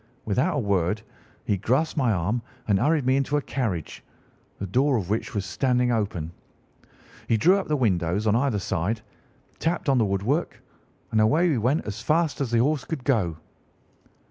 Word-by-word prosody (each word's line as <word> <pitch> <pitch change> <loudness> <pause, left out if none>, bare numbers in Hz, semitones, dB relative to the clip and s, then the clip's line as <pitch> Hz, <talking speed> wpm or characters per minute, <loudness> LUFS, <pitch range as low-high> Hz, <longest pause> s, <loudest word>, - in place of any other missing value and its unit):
Without 130 - +1
a - - +1
word 100 -1 0 0.4
he 100 - +1
grasped 130 - 0
my 130 -6 +2
arm 105 +5 0 0.3
and 100 -3 +3
hurried 150 +2 +2
me 130 +1 +3
into 140 +2 +1
a - - 0
carriage, 100 - -3 0.5
the 100 - -4
door 130 +7 +2
of 100 -3 -3
which 110 +2 -2
was 100 -2 -1
standing 125 +4 +1
open. 100 -8 -2 1.0
He 115 - +3
drew 180 - +4
up 190 - -5
the 150 - +1
windows 95 - +1
on 110 0 +3
either 125 -2 +1
side, 100 +3 -2 0.6
tapped 170 +1 -1
on 135 -2 +4
the 110 - +3
wood 100 -1 -1
work, 145 +10 -1 0.5
and 110 - +3
away 155 +11 +3
we 140 -7 +1
went 130 +8 +1
as 105 +1 -5
fast 155 +3 +1
as 135 - -1
the 120 - +1
horse 145 0 0
could 160 -6 -5
go." 100 - +1
120 Hz, 185 wpm, -25 LUFS, 100-140 Hz, 1.0 s, drew